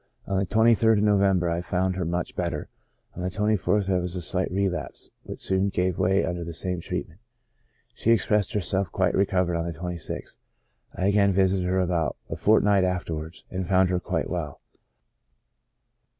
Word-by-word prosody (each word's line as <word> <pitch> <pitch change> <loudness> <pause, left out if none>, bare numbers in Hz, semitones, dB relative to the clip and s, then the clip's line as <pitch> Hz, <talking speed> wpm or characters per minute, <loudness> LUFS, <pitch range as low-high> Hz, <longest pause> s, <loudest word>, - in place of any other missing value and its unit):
On 95 -1 0
the 95 - -1
23rd 110 0 +4
of 105 - +1
November 100 -4 +3
I 85 +1 -1
found 95 +1 -1
her 90 -1 -2
much 85 +2 -2
better, - - -3 0.5
on 90 - -6
the 90 - -1
24th 105 +1 +1
there 95 -2 +1
wzs 90 +1 -4
a - - -3
slight 90 +2 -1
re 100 +1 +1
lapse, 90 -2 -4
which - - -9
soon 95 +1 +2
gave 90 -1 -1
way 95 +2 +2
under 85 -1 -3
the 85 0 -6
same 90 +1 -2
treatment. 80 +1 -5 0.7
She - - -2
expressed 105 -3 +2
herself 95 -2 0
quite - - +1
recovered 90 -3 +1
on 85 - -2
the 80 - -10
26th. 90 -1 -5 0.6
I 95 - -1
again 100 0 +3
vi 95 +1 +4
sited 95 -1 0
her 95 +1 +1
about 85 -3 0
a - - -1
fortnight 105 -2 +4
afterwards, 85 -3 -3
and 95 -1 -3
found 95 -1 +3
her 90 - +1
quite - - -2
well. - - -4
95 Hz, 180 wpm, -25 LUFS, 90-100 Hz, 0.7 s, 23rd